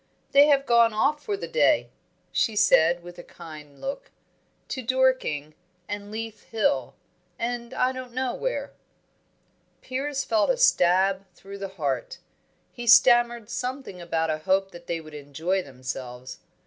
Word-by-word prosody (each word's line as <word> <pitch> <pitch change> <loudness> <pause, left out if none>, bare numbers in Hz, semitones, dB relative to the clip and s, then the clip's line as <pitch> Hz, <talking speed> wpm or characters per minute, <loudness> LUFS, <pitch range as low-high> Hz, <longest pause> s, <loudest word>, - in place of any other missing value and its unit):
"They 285 +1 +7
have 280 -2 +3
gone 235 -2 +4
off 290 +7 +1
for 410 -1 -2
the - - -6
day," 485 - +2 0.4
she 225 - +1
said, 170 -3 +4
with 175 0 -11
a - - -8
kind 150 -4 -12
look. 280 - -5 0.6
"To 260 - -3
Dorking, 255 - +1 0.3
and 205 0 -5
Leith 220 0 -7
Hill, 170 - 0 0.4
and 235 0 -3
I 255 0 +1
don't 255 -1 -8
know 255 0 -2
where." - - -3 1.1
Piers 275 +2 -2
felt 220 - +2
a - - +2
stab 190 - +3
through 200 +2 -10
the 195 - -4
heart. 140 -5 -2 0.5
He 240 -1 -8
stammered 240 -1 +6
something 255 -7 -5
about 165 -1 -1
a 155 - -2
hope 190 +4 +1
that 175 0 -13
they 170 -1 -2
would 155 -1 -12
enjoy 150 +6 -2
themselves. 130 -3 -7
205 Hz, 150 wpm, -25 LUFS, 165-255 Hz, 1.1 s, They